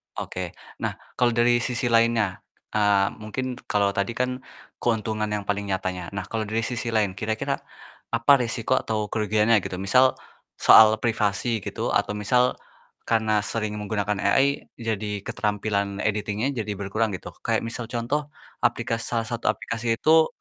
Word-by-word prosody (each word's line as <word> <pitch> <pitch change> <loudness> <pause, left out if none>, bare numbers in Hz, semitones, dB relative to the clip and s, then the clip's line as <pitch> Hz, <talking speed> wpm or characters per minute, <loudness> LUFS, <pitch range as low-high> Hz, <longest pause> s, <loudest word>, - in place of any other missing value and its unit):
Oke, 90 -2 -5 0.2
nah - - -2 0.3
kalau 120 -1 +3
dari 120 0 +4
sisi 120 0 -1
lainnya, 115 -4 +3 0.3
eee, 100 -2 +3
mungkin 125 +4 -4
kalau 100 -1 +2
tadi 100 +4 -1
kan 125 0 -1 0.4
keuntungan 110 -2 0
yang 105 -1 -2
paling 100 0 -1
nyatanya. 95 -2 -2
Nah 95 - -2
kalau 110 -2 -2
dari 110 +2 -1
sisi 120 0 -3
lain, 105 -3 +2
kira-kira 110 +1 -2 0.5
apa 115 +4 +3
risiko 115 -1 0
atau 105 -2 -3
kerugiannya 110 +1 +3
gitu? 95 - -5
Misal 130 +7 +4 0.4
soal 110 0 +8
privasi 115 0 +1
gitu - - -2
atau - - +1
misal 125 +4 +2 0.5
karena 110 -2 +2
sering 110 -2 -2
menggunakan 105 -1 -2
AI 135 +8 +2
jadi 105 -3 -3
keterampilan 100 -1 -1
editing-nya 105 +3 -1
jadi 105 -1 -3
berkurang 110 +3 0
gitu. - - -8 0.2
Kayak - - +1
misal 115 +1 -4
contoh 130 +5 -2 0.4
aplikas 120 -1 0
salah 115 -2 -1
satu 120 -1 -5
aplikasi 115 0 -2
itu 160 0 +5
110 Hz, 145 wpm, -25 LUFS, 105-120 Hz, 0.5 s, soal